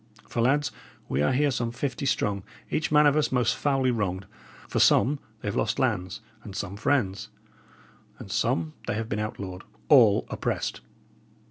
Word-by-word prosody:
For, 115 - -2
lads, 145 +5 +2 0.4
we 70 - 0
are 75 - +3
here 145 +2 +2
some 120 -2 -2
fifty 130 +2 -3
strong, 100 -6 0 0.3
each 155 - -1
man 150 0 +6
of 145 -1 +5
us 155 -1 +1
most 125 -2 +2
foully 135 -3 +1
wronged; 95 -5 -2 0.4
for - - -1
some 140 +3 +4 0.2
they - - -6
have 100 - -2
lost - - 0
lands, 90 +3 -1 0.2
and 100 -3 -9
some 100 -2 -4
friends; 100 -3 0 0.9
and - - -10
some 80 -2 0
they - - -1
have 110 0 -3
been 105 - -2
outlawed 100 -3 -5 0.3
all 115 -9 +6
oppressed! - - -2
115 Hz, 165 wpm, -26 LUFS, 100-140 Hz, 0.9 s, man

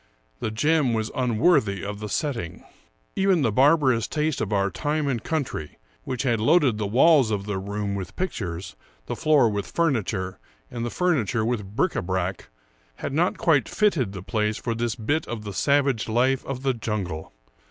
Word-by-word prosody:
The - - -2
gem 135 +2 +2
was 110 -1 -2
unworthy 115 - +2
of 105 0 -5
the 105 0 -5
setting. 115 - -3 0.5
Even 190 -5 +3
the 115 - +2
barbarous 130 -2 +4
taste 155 -1 -1
of - - -2
our 100 -1 +1
time 150 0 -1
and 120 -5 -1
country, 140 - -3 0.3
which 130 -1 -2
had 120 -4 +1
loaded 125 -1 +3
the 105 - -1
walls 135 +3 +5
of 100 -2 -2
the 105 -2 -2
room 100 +1 -3
with 95 -2 -5
pictures, 90 - -4 0.3
the - - -4
floor 150 -6 +4
with 105 -2 -2
furniture, 105 - -1 0.3
and 115 - -4
the 120 - -2
furniture 125 - 0
with 105 -4 -3
bric 170 +7 +1
a - - 0
brac, 95 0 -3 0.5
had 135 - -5
not 170 +5 +1
quite 145 -8 +2
fitted 160 - +1
the 95 -2 -7
place 105 0 -1
for 115 - -2
this 115 0 -2
bit 135 +7 -1
of 115 -3 -5
the 105 -1 -6
savage 140 -2 +1
life 130 +4 +2
of 135 -1 -4
the 135 -1 +2
jungle. 100 -9 -4
115 Hz, 180 wpm, -25 LUFS, 105-145 Hz, 0.5 s, walls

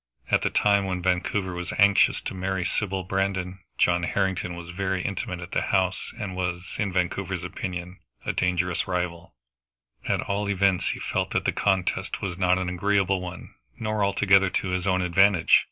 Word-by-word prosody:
At - - +4
the - - +1
time 100 -1 +3
when 90 -2 -3
Vancouver 95 +1 0
was 90 -1 -4
anxious 100 0 +5
to - - -5
marry 95 -1 -2
Sybil 95 -2 -1
Brandon, 95 0 -2 0.2
John 85 0 +3
Harrington 90 -1 -1
was 85 0 -8
very 95 0 -2
intimate 90 -2 -3
at 85 - -8
the - - +1
house, 95 -1 0
and 95 -4 -4
was, 90 0 -3
in 100 -2 0
Vancouver's 90 -1 -1
opinion, 90 0 -5 0.3
a - - 0
dangerous 90 -1 0
rival; 90 -2 -3 0.7
at - - +1
all 100 0 -2
events 95 -2 +2
he - - -3
felt - - -1
that - - 0
the - - +3
contest 95 -3 0
was 90 -3 -3
not 90 0 +2
an 95 -1 -2
agreeable 95 +1 +1
one, 90 0 -8 0.2
nor 110 -2 -1
altogether 100 -1 +4
to 95 +1 -1
his 90 +1 -1
own 95 -1 +2
advantage. 90 0 +5
95 Hz, 175 wpm, -26 LUFS, 90-100 Hz, 0.7 s, anxious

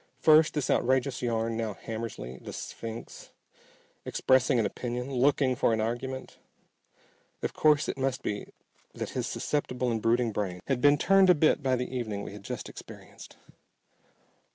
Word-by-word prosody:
First 155 0 +5
this 145 -3 0
outrageous 130 +1 +1
yarn, 115 -2 -1
now 110 -3 -3
Hammersly, 110 - -6
the - - -7
"sphinx," 115 0 -8 0.7
expressing 130 0 +2
an 115 - +2
opinion, 125 +5 -4
looking 130 0 +2
for 120 - +2
an 110 - 0
argument! 120 +4 -4 1.0
Of - - -2
course 150 0 +3
it - - -4
must 130 -1 -1
be 105 - -3 0.5
that - - -4
his - - -2
susceptible 125 -4 -1
and 115 -1 -1
brooding 115 +1 +2
brain 95 -4 -3
had 130 -3 -1
been 145 +1 +6
turned 195 +4 +5
a 180 - +7
bit 155 0 +3
by 130 -2 +2
the 125 +1 -4
evening 110 -5 -3
we - - -7
had 105 - -9
just - - -5
experienced. - - -12
125 Hz, 155 wpm, -28 LUFS, 115-135 Hz, 1.0 s, a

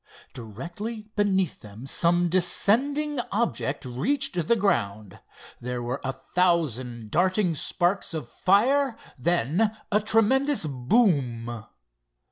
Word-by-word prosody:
Directly 175 - -7
beneath 190 -5 +1
them 105 +3 -11
some 175 +5 +2
descending 260 - +1
object 155 - -1
reached 170 - 0
the 235 - +4
ground. 105 - -1 0.4
There 125 0 -4
were 125 +3 -3
a 135 - -1
thousand 130 -7 -1
darting 185 +1 +2
sparks 175 +3 -1
of 150 -7 -5
fire, 240 - +2 0.2
then 175 - +1
a 210 - +4
tremendous 225 - +2
boom. 125 - 0
175 Hz, 100 wpm, -26 LUFS, -, 0.4 s, the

